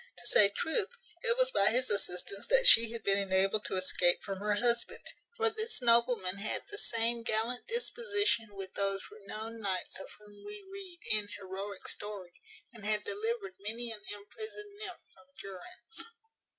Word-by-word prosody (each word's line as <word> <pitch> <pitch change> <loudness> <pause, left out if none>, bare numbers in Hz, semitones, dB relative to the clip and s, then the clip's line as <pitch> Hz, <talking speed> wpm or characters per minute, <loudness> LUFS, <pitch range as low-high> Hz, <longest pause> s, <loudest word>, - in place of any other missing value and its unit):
To - - -12
say 200 - +6
truth, 320 - -1 0.3
it 470 0 +2
was - - +5
by 200 - +4
his 250 +3 +2
assistance 200 0 -2
that - - +4
she 230 - +10
had 230 -2 -6
been 200 0 +2
enabled 195 +2 +1
to - - +1
escape 185 -1 +3
from 195 -1 -5
her 210 +1 0
husband; 235 +2 0 0.3
for 450 -1 +2
this 440 +1 -2
nobleman 235 -6 +3
had 210 - -4
the 410 - -3
same 230 0 +1
gallant 230 +2 -1
disposition 410 - +1
with 190 -1 -8
those 195 -1 -1
renowned 215 +2 -8
knights 190 -3 -3
of 190 - -9
whom 205 -1 -17
we 415 -1 -10
read 375 -3 -10
in 210 -1 +2
heroic 195 +1 -7
story, 200 -4 -6 0.4
and 225 -3 -13
had 210 0 0
delivered 205 -2 -3
many 230 +4 -5
an 215 -2 -8
imprisoned 415 - -9
nymph 380 -5 -8
from 265 - -22
durance. 360 - -6
220 Hz, 165 wpm, -31 LUFS, -, 0.4 s, she